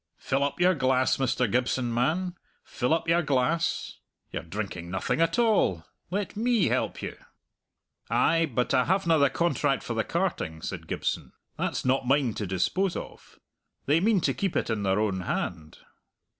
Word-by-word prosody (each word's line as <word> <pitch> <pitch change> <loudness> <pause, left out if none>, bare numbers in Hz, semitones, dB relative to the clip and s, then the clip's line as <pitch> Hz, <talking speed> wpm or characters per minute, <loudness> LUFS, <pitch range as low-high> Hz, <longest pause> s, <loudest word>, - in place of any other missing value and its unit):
"Fill 135 +1 0
up 140 +3 -2
your 180 +1 +5
glass, 130 -4 +2
Mr. 130 -1 +1
Gibson, 125 -1 0
man; 165 +10 0 0.3
fill 125 +2 -2
up 165 0 +1
your 170 +1 +4
glass. 150 +3 0 0.3
You're - - -3
drinking 90 -1 -5
nothing 95 - -1
at 165 0 +2
all. 210 - +2 0.2
Let 200 +3 -3
me 230 -3 +2
help - - -1
you." - - -4 0.9
"Ay, 165 0 +3
but 125 +1 0
I 125 - +4
havena 170 -4 +2
the 140 -1 +5
contract 145 -5 0
for 120 - -3
the 110 -1 0
carting," 165 - -2
said - - -5
Gibson. - - -3 0.2
"That's - - -2
not 130 0 +1
mine 135 -3 +2
to 105 - -4
dispose 170 - 0
of. - - -9 0.5
They 150 +4 +3
mean 205 0 +3
to - - +1
keep 195 -3 -2
it - - 0
in 110 -2 -1
their 95 0 +1
own 100 -3 0
hand." 80 -3 -4
135 Hz, 170 wpm, -27 LUFS, 115-170 Hz, 0.9 s, your